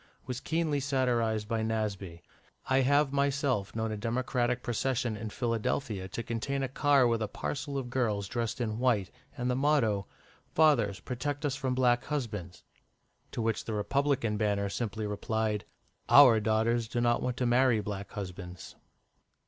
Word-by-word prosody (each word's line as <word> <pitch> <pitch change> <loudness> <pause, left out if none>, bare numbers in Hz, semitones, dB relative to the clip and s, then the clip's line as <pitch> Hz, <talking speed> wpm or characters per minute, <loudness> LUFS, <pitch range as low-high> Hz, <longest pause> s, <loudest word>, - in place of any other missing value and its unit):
was 125 -1 -4
keenly 160 -2 0
satirised 120 -6 0
by 115 0 -1
Nasby. 100 -6 -3 0.4
I 130 0 +3
have 140 +1 +3
myself 140 -7 0
known 110 0 -1
a 110 - -3
Democratic 125 +2 -1
procession 120 -1 -1
in 110 +1 -5
Philadelphia 115 -3 -2
to 115 +5 -5
contain 135 +5 -2
a - - 0
car 140 0 +3
with 115 -1 +1
a 110 - 0
parcel 140 +6 -4
of 125 -3 -4
girls 110 -6 0
dressed 115 +1 -3
in 110 -2 -2
white, 115 -7 +1 0.3
and 125 - -2
the 125 - +1
motto, 125 - +2 0.5
"Fathers, 120 -11 +4
protect 145 +4 -3
us 140 -2 0
from 130 -2 -2
Black 125 -1 +2
Husbands." 105 - -4 0.7
To 115 - -2
which 115 -1 -1
the 110 - -3
Republican 125 +1 0
banner 100 -2 0
simply 110 0 -3
replied, 105 +1 -1 0.4
"Our 125 -6 +8
Daughters 110 +2 +1
do 120 - -2
not 120 0 +2
want 125 0 -2
to 125 - 0
marry 120 -1 +4
Black 100 -1 -5
Husbands." 90 -2 -7
120 Hz, 155 wpm, -30 LUFS, 105-130 Hz, 0.7 s, Our